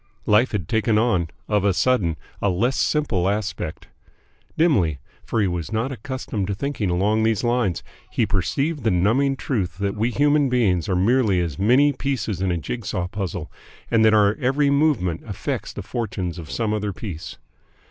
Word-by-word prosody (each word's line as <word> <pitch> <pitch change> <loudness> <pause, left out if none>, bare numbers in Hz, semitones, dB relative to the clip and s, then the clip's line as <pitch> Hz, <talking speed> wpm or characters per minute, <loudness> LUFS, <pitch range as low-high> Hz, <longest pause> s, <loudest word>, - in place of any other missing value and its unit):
Life 105 +5 +4
had 95 -8 -3
taken 110 -1 +1
on 105 -7 +2 0.2
of 105 -2 +1
a 100 -2 +2
sudden 95 -11 +2 0.2
a 100 - +2
less 115 +9 +1
simple 105 - +1
aspect. 100 -6 -3 0.7
Dimly, 100 - +3 0.3
for 115 - -2
he - - +3
was 90 +1 -3
not 115 +5 -1
accustomed 125 -5 -4
to 100 - -2
thinking 140 -4 -2
along 100 +5 +2
these 110 -2 +1
lines, 120 -7 0 0.3
he - - +1
perceived 150 0 -1
the 110 - +3
numbing 115 +10 +2
truth 95 - -2
that 100 0 -1
we 110 +3 0
human 145 +2 +3
beings 105 -7 +1
are 95 - +1
merely 105 0 +3
as 85 -5 -3
many 130 +8 +4
pieces 115 -8 -2
in 95 -1 +1
a 85 - 0
jig 115 - -5
saw 90 -3 -2
puzzle 90 -3 -5 0.4
and 115 -1 +4
that 110 0 +5
our 105 0 +4
every 140 +3 +2
movement 140 - +1
affects 100 - -4
the - - -7
fortunes 95 -7 -4
of 80 -2 -9
some 110 +2 -1
other 105 -1 -2
piece. 90 -6 -7
105 Hz, 180 wpm, -23 LUFS, 95-125 Hz, 0.7 s, that